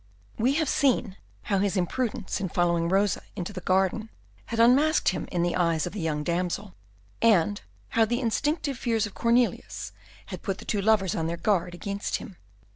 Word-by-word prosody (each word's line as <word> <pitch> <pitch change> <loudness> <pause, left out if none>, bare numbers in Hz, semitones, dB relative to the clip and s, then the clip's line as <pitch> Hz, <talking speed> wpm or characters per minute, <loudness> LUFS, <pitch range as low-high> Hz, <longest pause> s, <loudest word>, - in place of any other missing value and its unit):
We 250 +5 +3
have 315 -1 +1
seen 250 -9 +1 0.3
how 200 -2 0
his 200 0 0
imprudence 205 +2 -2
in 190 - -2
following 170 -1 +1
Rosa 195 +1 +2
into 180 +3 -5
the 185 - -6
garden 190 +4 +1 0.4
had 230 - -3
unmasked 275 +7 +5
him 185 - -3
in 175 -2 0
the 175 0 0
eyes 170 -3 +1
of 175 - -5
the 210 - -5
young 155 -3 -1
damsel, 180 +3 -2 0.5
and 205 -3 +3 0.3
how 225 -1 +3
the 240 +2 -1
instinctive 280 +3 -1
fears 225 -3 +1
of 205 - -8
Cornelius 235 +1 0 0.3
had - - -7
put 195 -2 -2
the - - -11
two 205 - -1
lovers 200 -3 +3
on 160 -1 -1
their 170 +1 -3
guard 175 -1 0
against 200 +3 -3
him. 185 - -7
200 Hz, 185 wpm, -27 LUFS, 175-230 Hz, 0.5 s, unmasked